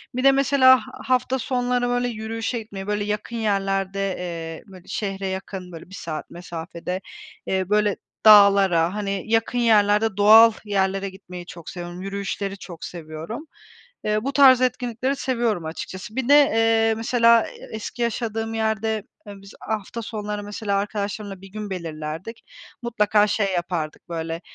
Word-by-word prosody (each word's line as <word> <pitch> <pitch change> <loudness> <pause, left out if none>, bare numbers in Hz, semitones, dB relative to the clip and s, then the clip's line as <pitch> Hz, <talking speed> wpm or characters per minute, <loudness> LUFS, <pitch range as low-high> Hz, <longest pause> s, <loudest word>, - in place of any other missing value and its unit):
Bir 255 - -1
de 275 - +7
mesela 270 -1 +6
ha - - -7 0.2
hafta 255 0 +1
sonları 245 0 0
öyle 245 0 0
yürüyüşe 225 +1 -3
gitmeyi, 200 -3 -8
böyle, 210 0 -1
yakın 210 +3 -3
yerlerde, 195 -2 -1
eee, 165 -2 -6
bö 185 - -11
şehre 195 -2 -3
yakın 190 -1 -6
böyle 165 +2 -11
1 190 - -10
saat 160 -4 -6
mesafede, 175 +1 -6 0.4
eee, 190 0 -1
böyle, 210 -1 +2 0.3
dağlara, 200 -5 +6
hani, 200 -2 -2
yakın 225 +2 +1
yerlerde 210 -2 +3
doğal 220 +3 +8
yerlere 195 -1 0
gitmeyi 180 -2 -10
çok 170 -2 -10
seviyorum. 175 0 -7
Yürüyüşleri 200 0 -4
çok 170 -3 -10
seviyorum. 165 - -7 0.6
Eee, 215 +1 0
bu 275 +1 -2
tarz 260 -3 +7
etkinlikleri 250 +1 0
seviyorum 235 -10 -1
açıkçası. 190 +6 -7
Bir 265 -1 -2
de, 285 - +7
eee, 225 -4 +3
mesela 230 0 +4
e - - -12
eski 220 +2 -6
yaşadığım 225 -1 -2
yerde, 220 -1 -1 0.2
ııı, 200 -1 -10
biz 195 0 -13
hafta 220 +2 -4
sonları 210 -1 -5
mesela 205 -1 -2
arkadaşlarımla 205 -1 -4
bir 195 - -11
gün 210 -1 -6
belirlerdik. 165 +3 -6 0.4
Mutlaka 210 -3 +2
şey 200 -2 0
yapardık 175 -3 -3
böyle, 165 0 -4
205 Hz, 150 wpm, -23 LUFS, 190-225 Hz, 0.6 s, doğal